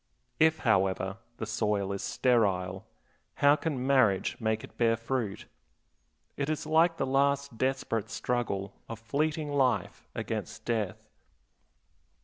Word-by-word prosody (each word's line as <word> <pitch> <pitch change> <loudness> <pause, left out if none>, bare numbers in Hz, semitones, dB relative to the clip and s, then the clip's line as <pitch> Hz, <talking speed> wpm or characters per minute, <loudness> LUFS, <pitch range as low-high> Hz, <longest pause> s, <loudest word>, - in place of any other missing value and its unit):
If, 160 0 +5
however, 95 -2 +2 0.2
the - - -3
soil 105 -3 0
is 100 - -3
sterile, 95 -7 +1 0.5
how 145 +1 +5
can 145 -5 -3
marriage 130 -8 +3
make 110 -1 0
it - - -12
bear 115 -1 +2
fruit? 115 -3 -3 0.9
It 140 +1 -2
is 155 -1 -2
like 165 +2 +3
the - - 0
last 140 -1 +1
desperate 130 -5 -1
struggle 115 -5 -2 0.2
of 115 - -5
fleeting 150 +6 -1
life 130 -3 0
against - - -4
death. 110 -5 -2
120 Hz, 125 wpm, -29 LUFS, 105-140 Hz, 0.9 s, If